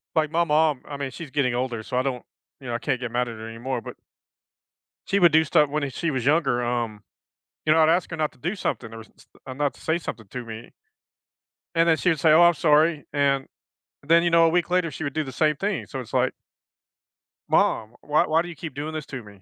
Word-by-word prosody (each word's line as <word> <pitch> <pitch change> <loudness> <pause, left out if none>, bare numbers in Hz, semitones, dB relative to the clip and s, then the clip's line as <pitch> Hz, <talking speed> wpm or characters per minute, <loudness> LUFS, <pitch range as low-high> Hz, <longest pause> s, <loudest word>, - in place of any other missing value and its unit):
Like 155 -2 +1
my 170 +1 +2
mom, 150 -4 +2
I 145 - -7
mean, 140 -2 -4
she's 160 +4 -8
getting 135 -4 +1
older, 120 -3 -2
so 125 - -4
I - - +3
don't, 130 -2 -3 0.4
you 135 - -11
know, 120 - -3
I 120 - -1
can't 130 -2 -1
get 125 -2 -5
mad 125 +1 0
at 115 - -6
her 110 +1 -8
anymore, 120 +2 -4
but - - -9 1.1
she 200 - +2
would 175 -3 +6
do 160 +1 +4
stuff 150 -1 +3
when 150 0 -1
e - - -4
she 165 +5 -2
was 130 -4 -2
younger 135 -5 +2
um, 120 -3 -2 0.7
you 155 - +5
know, 160 - +4
I'd 160 0 +5
ask 170 +1 +1
her 165 - -4
not 155 -1 -1
to - - -24
do 175 - -3
something 115 - -3
or 115 - -8
s 110 - -14
s - - -19 0.2
or 130 - -6
not 145 +1 -1
to - - -18
say 160 +1 0
something 115 - -7
to 125 +3 -6
me 115 0 -9 1.0
and 165 0 +3
then 160 -1 +4
she 180 - +1
would 160 -4 +1
say, 160 +2 +4
"Oh, 160 +3 +7
I'm 175 0 +6
sorry," 155 0 +3
and 140 -2 +1 0.6
then, 165 +3 +4
you 175 - +2
know, 165 0 +6
a - - +4
week 175 +1 0
later, 180 -2 +2
she 145 +1 -7
would 140 -2 -3
do 155 - -1
the 135 - -7
same 150 +3 +1
thing. 195 -1 -2
So 135 - -6
it's 125 - -9
like - - +2 1.2
"Mom, 115 +2 +1
why 150 +1 +2
why 160 +1 +3
do 175 - -6
you 170 - -8
keep 160 -4 -7
doing 150 +3 -5
this 155 -2 -5
to 135 -4 -7
me?" 100 -2 -16
145 Hz, 260 wpm, -24 LUFS, 125-160 Hz, 1.2 s, Oh